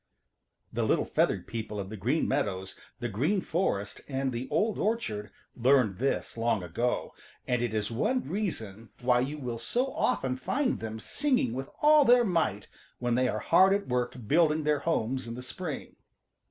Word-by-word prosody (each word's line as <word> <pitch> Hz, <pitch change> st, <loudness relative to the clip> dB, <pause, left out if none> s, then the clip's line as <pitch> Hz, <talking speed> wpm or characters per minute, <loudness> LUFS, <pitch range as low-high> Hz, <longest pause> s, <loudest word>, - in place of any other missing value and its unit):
= -, -, -41 dB
|The -, -, -1 dB
little -, -, +2 dB
feathered -, -, +1 dB
people 110 Hz, -2 st, -5 dB
of 95 Hz, -1 st, -5 dB
the -, -, -5 dB
Green 125 Hz, -, 0 dB
Meadows, 95 Hz, -1 st, -1 dB, 0.2 s
the 120 Hz, -, -2 dB
Green 145 Hz, -, +1 dB
Forest 160 Hz, -, -1 dB
and 135 Hz, -1 st, -1 dB
the 120 Hz, +2 st, -4 dB
Old 205 Hz, +8 st, +1 dB
Orchard 110 Hz, -, -1 dB, 0.3 s
learned 125 Hz, -5 st, +3 dB
this 135 Hz, -2 st, -1 dB
long 115 Hz, -4 st, +1 dB
ago, 115 Hz, +9 st, -1 dB, 0.3 s
and 125 Hz, -1 st, +1 dB
it 120 Hz, -2 st, 0 dB
is 110 Hz, 0 st, -2 dB
one 250 Hz, -, 0 dB
reason 115 Hz, -, -4 dB
why 125 Hz, 0 st, +3 dB
you 140 Hz, +5 st, -2 dB
will 125 Hz, -5 st, -4 dB
so 250 Hz, -, -1 dB
often 135 Hz, -, 0 dB
find 255 Hz, -, 0 dB
them 110 Hz, 0 st, -5 dB
singing 255 Hz, -, 0 dB
with 135 Hz, +2 st, -4 dB
all 300 Hz, 0 st, +7 dB
their 245 Hz, -2 st, +6 dB
might 160 Hz, -, 0 dB, 0.3 s
when 120 Hz, -1 st, -1 dB
they 125 Hz, +1 st, +3 dB
are -, -, -1 dB
hard 190 Hz, +3 st, +5 dB
at 200 Hz, 0 st, -1 dB
work 125 Hz, -1 st, -1 dB
building 155 Hz, +1 st, +3 dB
their 150 Hz, -1 st, +2 dB
homes 130 Hz, -5 st, -1 dB
in 115 Hz, -, -5 dB
the 125 Hz, -, -7 dB
spring. 155 Hz, +3 st, -6 dB
130 Hz, 180 wpm, -29 LUFS, 115-170 Hz, 0.3 s, all